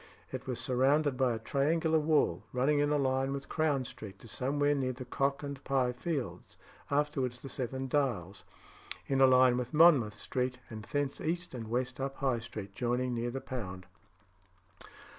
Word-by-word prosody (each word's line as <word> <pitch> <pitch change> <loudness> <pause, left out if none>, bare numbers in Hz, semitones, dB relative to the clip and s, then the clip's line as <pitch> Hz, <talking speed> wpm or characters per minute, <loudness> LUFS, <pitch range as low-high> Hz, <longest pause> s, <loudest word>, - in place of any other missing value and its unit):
It 130 +1 -6
was 125 -2 -2
surrounded 135 +3 +2
by 125 -1 +2
a - - -3
triangular 160 +7 +1
wall, 150 - +2
running 135 +4 +2
in 145 0 +2
a 150 - +2
line 135 -1 +1
with 140 0 -5
Crown 150 -5 +1
Street 100 -4 -9
to - - -12
somewhere 145 +5 +1
near 130 -3 -1
the 130 +1 -8
Cock 140 +3 -1
and 140 -1 -6
Pye 130 -2 +1
Fields 135 +2 -4 0.3
(afterwards 140 -4 0
the 135 - -6
Seven 130 +1 -3
Dials), 120 - -1 0.6
in 135 -1 +1
a 135 - +8
line 130 -1 +5
with 125 +4 -4
Monmouth 145 -10 +6
Street, 125 +3 -2
and 110 -1 -7
thence 145 +1 -2
east 175 +1 -2
and 115 -3 -6
west 125 +3 -2
up 135 0 -3
High 130 -4 0
Street, 105 -3 -8
joining 125 +3 -1
near 120 0 -1
the 135 +2 -4
Pound. 95 -8 -6
130 Hz, 175 wpm, -32 LUFS, 120-140 Hz, 0.6 s, a